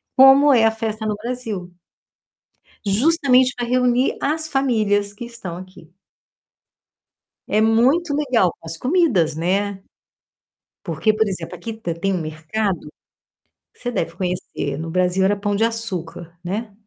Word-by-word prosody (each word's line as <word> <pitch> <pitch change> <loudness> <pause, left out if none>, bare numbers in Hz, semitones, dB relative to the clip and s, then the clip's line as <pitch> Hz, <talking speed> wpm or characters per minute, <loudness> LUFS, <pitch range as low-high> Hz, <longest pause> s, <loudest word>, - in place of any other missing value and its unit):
como 270 +2 +7
é 225 -3 +5
a 225 - +4
festa 220 -1 -4
no 210 -1 -1
Brasil. 220 -5 -5 1.1
Justamente 255 +3 +3
pra 245 - -2
reunir 250 +1 +2
as 315 +2 -1
famílias 215 -8 +1
que 220 - -7
estão 230 -8 -7
aqui. 185 -3 -12 1.6
É 215 - +2
muito 255 +9 +3
legal 260 -10 +2
para - - -15
as 165 0 -5
comidas, 245 - +2
né, 195 +4 -1 1.0
porque, 170 +6 0
por 220 +1 +2
exemplo, 185 -3 -5
aqui 225 +7 -6
t 220 -7 -4
tem 195 +4 -1
um 185 - -1
mercado, 160 +2 -3 0.8
você 245 - -4
deve 245 - -2
conhecer, 180 -6 -3
no 165 +1 -5
Brasil 180 +2 +1
era 200 +2 +3
Pão 205 0 -1
de 220 - +2
Açúcar, 175 -7 -4
né? 210 +5 -4
215 Hz, 140 wpm, -21 LUFS, 180-245 Hz, 1.6 s, como